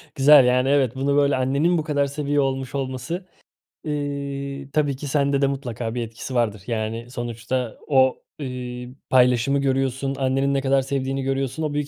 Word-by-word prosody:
Güzel. 140 -1 +7
Yani, 125 +1 +3
evet, 135 -3 +2
bunu, 140 +1 0
böyle, 145 -1 +3
annenin 140 +7 +2
bu 155 - -1
kadar 145 -2 +1
seviyor 145 0 0
olmuş 135 0 -3
olması, 135 +7 -4 0.6
ııı, 140 -1 -4
tabii 145 -3 +1
ki 145 +2 -7
sende 140 0 +1
de 140 - +4
mutlaka 120 -4 -4
bir 120 - -1
etkisi 115 +3 -7
vardır. 110 -5 0
Yani 115 +1 -3
sonuçta 120 0 -3
o, 130 -2 +3 0.2
ııı, 125 -1 -6
paylaşımı 125 +2 +4
görüyorsun, 135 0 0
annenin 135 +1 +1
ne 135 - +1
kadar 135 0 +2
sevdiğini 135 0 -2
görüyorsun, 135 +2 -2
o 150 -1 -1
büyük 145 -1 -1
135 Hz, 165 wpm, -23 LUFS, 125-140 Hz, 0.6 s, Güzel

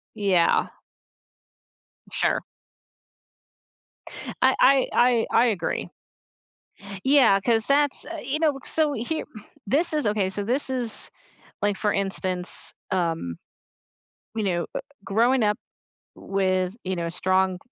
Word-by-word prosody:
Yeah. 195 -5 +2 1.4
Sure. - - +1 2.0
I - - +5
I 270 0 +5
I 240 -2 +3
I 235 - +4
agree. 210 -6 -2 1.2
Yeah, 265 -8 +5
'cause 225 +1 +2
that's 285 0 +2
uh, 335 -1 -6
you 275 +4 -2
know, 315 -2 +3
c 270 - -10
uh, - - -10
so, 310 -2 +2
here 280 +6 -3 0.4
this 310 - +2
is 300 -6 0
okay, 205 -2 +1
so, 200 +2 -3
this 255 +7 0
is 245 -4 -2 0.5
like, 205 -1 +1
for 210 +1 +1
instance, 185 -2 -1 0.2
um 165 - -1 1.0
you 220 - -2
know, 175 -3 -1
uh, - - -2 0.2
growing 235 +5 +2
up 210 0 +2 0.6
with, 185 0 -1
you 190 0 -1
know, 170 -1 -2
a - - -3
strong 185 +1 +1
210 Hz, 125 wpm, -24 LUFS, 190-265 Hz, 2.0 s, I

